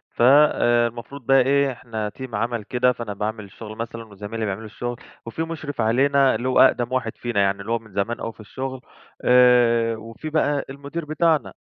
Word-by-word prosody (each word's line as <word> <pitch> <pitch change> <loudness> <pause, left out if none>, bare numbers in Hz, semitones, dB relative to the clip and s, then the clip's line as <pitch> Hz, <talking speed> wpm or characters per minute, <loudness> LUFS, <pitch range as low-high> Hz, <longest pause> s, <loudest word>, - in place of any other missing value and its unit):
فالمفروض 120 -1 +3
بقى 135 +1 +5
إيه، 140 +1 +2
إحنا 110 -3 -5
تيم 125 +2 -8
عمل 115 +1 -2
كده، 125 +4 +2
فأنا 120 -4 -5
باعمل 110 +2 -4
الشغل 105 +2 -10
مثلًا 115 0 -6
وزمايلي 105 +2 -6
بيعملوا 105 +2 -4
الشغل، 120 +2 -5 0.3
وفي 115 +8 -4
مُشرف 155 -5 -5
علينا 135 +4 +3
اللي 120 +3 -3
هو 130 - +3
أقدم 120 0 +4
واحد 125 -4 -2
فينا 120 -4 -2
يعني، 100 0 +1
اللي 105 +4 -6
هو 115 - +1
من 110 -2 -18
زمان 110 +5 -2
أوي 115 - -5
في - - -31
الشغل 130 +4 -6 0.4
آآ، 120 -2 +4
وفي 115 +7 -8
بقى 145 -2 0
المدير 140 +4 -6
بتاعنا، 155 - +1
120 Hz, 180 wpm, -23 LUFS, 110-135 Hz, 0.4 s, بقى